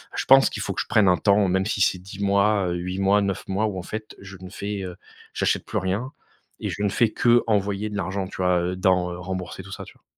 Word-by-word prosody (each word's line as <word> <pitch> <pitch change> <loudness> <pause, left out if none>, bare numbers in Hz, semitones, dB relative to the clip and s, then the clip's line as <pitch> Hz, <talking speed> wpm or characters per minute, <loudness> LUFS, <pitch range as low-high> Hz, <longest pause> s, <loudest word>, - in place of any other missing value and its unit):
Je - - -2
pense 135 0 +7
qu'il 105 - -5
faut 100 - -3
que - - -2
je - - -6
prenne 105 -3 +4
un 90 - +4
temps 100 +3 +3
même 95 +1 +1
si 105 - -2
c'est 90 -1 +2
10 95 +2 -11
mois, 100 -1 +2
8 90 +2 -3
mois, 100 +1 +3
9 100 -1 -3
mois 100 +3 0
ou 100 -3 -4
en - - -7
fait 110 +3 -7
je 95 -1 -11
ne 95 - -9
fais, 100 +1 -5
heu, 90 -1 -6 0.4
j'achète - - 0
plus - - -3
rien 100 +9 -2 0.5
et - - -3
je 100 - -5
ne 105 - +2
fais 110 +2 +2
qu'envoyer 105 -4 +2
de 105 - -4
l'argent 95 +1 -2
tu - - -10
vois, 90 -1 +2
heu, 90 +1 -2
dans, 90 -1 +2
heu, 85 - -7
rembourser 95 0 -5
tout 100 - -12
ça, - - -7
tu - - -14
vois? - - -28
95 Hz, 265 wpm, -24 LUFS, 95-105 Hz, 0.5 s, pense